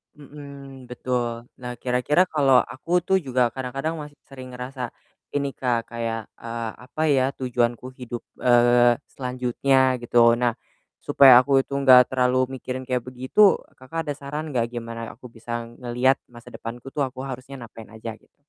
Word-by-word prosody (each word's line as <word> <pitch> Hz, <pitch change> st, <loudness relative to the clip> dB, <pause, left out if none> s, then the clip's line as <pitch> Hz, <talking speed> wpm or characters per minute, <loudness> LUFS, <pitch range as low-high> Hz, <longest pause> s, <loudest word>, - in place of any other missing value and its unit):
Mhm, 140 Hz, -2 st, -12 dB
betul. 120 Hz, -1 st, -3 dB, 0.2 s
Nah, 125 Hz, 0 st, -5 dB
kira-kira 125 Hz, +8 st, +2 dB
kalau 135 Hz, -4 st, +5 dB
aku 170 Hz, +7 st, -1 dB
tuh 190 Hz, +1 st, +2 dB
juga 125 Hz, -5 st, 0 dB
kadang-kadang 135 Hz, +5 st, -3 dB
masih 145 Hz, -1 st, -10 dB
sering 130 Hz, -2 st, -10 dB
ngerasa 125 Hz, 0 st, -5 dB, 0.5 s
ini, 140 Hz, -1 st, 0 dB
Kak, 120 Hz, -4 st, -2 dB
kayak, 115 Hz, -2 st, -4 dB
eee, 115 Hz, -1 st, -5 dB
"Apa 155 Hz, +4 st, -6 dB
ya 130 Hz, -2 st, +3 dB
tujuanku 125 Hz, 0 st, -1 dB
hidup, 120 Hz, -1 st, -6 dB, 0.2 s
eee, 120 Hz, 0 st, +5 dB, 0.2 s
selanjutnya?" 130 Hz, 0 st, +1 dB
Gitu. 120 Hz, -, -9 dB
Oh 115 Hz, 0 st, +7 dB
nah, 120 Hz, -2 st, +1 dB, 0.5 s
supaya 130 Hz, -3 st, +8 dB
aku 135 Hz, +1 st, +3 dB
itu -, -, -30 dB
nggak 130 Hz, -2 st, +7 dB
terlalu 130 Hz, 0 st, +1 dB
mikirin 130 Hz, 0 st, -5 dB
kayak 125 Hz, -2 st, -1 dB
begitu, 130 Hz, +11 st, +3 dB, 0.2 s
Kakak 160 Hz, +5 st, -6 dB
ada 145 Hz, -, -1 dB
saran 150 Hz, +3 st, -5 dB
nggak 120 Hz, -3 st, +1 dB
gimana 115 Hz, -1 st, -6 dB
ya -, -, -8 dB
aku 125 Hz, +1 st, -12 dB
bisa 120 Hz, +1 st, -5 dB, 0.2 s
ngelihat 125 Hz, +2 st, +1 dB
masa 120 Hz, -1 st, -14 dB
depanku 120 Hz, +3 st, -8 dB
tuh, 145 Hz, -, -1 dB
aku 130 Hz, 0 st, -9 dB
harusnya 130 Hz, +1 st, -8 dB
ngapain 115 Hz, -1 st, -11 dB
aja, 110 Hz, +1 st, -6 dB
gitu? -, -, -32 dB
125 Hz, 160 wpm, -24 LUFS, 120-135 Hz, 0.5 s, supaya